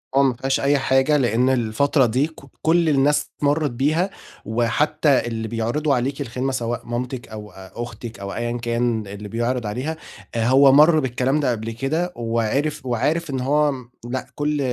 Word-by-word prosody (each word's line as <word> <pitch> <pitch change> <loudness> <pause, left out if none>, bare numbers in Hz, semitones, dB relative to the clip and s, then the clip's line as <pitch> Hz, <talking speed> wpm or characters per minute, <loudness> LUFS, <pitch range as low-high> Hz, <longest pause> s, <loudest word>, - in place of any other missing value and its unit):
آه، 140 - +5
ما 135 -2 +3
فيهاش 135 +2 -1
أي 140 +1 +3
حاجة 135 +2 +3
لأن 125 -1 +2
الفترة 130 +3 +2
دي 125 +6 +1
كُ 160 - -15 0.2
كُلّ 165 0 +3
الناس 145 0 +2
مرّت 145 0 +1
بيها، 155 +9 +1 0.4
وحتى 120 +5 +1
اللي 110 -1 -3
بيعرضوا 120 +7 0
عليكِ 135 +3 -2
الخدمة 130 +1 -2
سواء 120 -2 -3
مامتِك 120 +1 -4
أو 105 -1 -9
أختِك 110 +3 -8
أو 100 0 -5
أيًا 120 0 -2
كان 115 -2 -1
اللي 100 +1 -8
بيعرض 120 +2 -1
عليها، 130 +10 -3 0.4
آآ 115 -1 +1
هو 135 +2 +6
مَرّ 155 +3 +6
بالكلام 130 +2 0
ده 140 -4 +1
قبل 115 -1 -3
كده، 155 +10 -2
وعِرِف 120 +6 -1
وعارف 145 +7 0
إن 135 -2 -2
هو 145 +3 +2
م 125 -3 -8 0.2
لأ 130 +1 -3
كُلّ 150 0 -1
130 Hz, 170 wpm, -22 LUFS, 115-145 Hz, 0.4 s, هو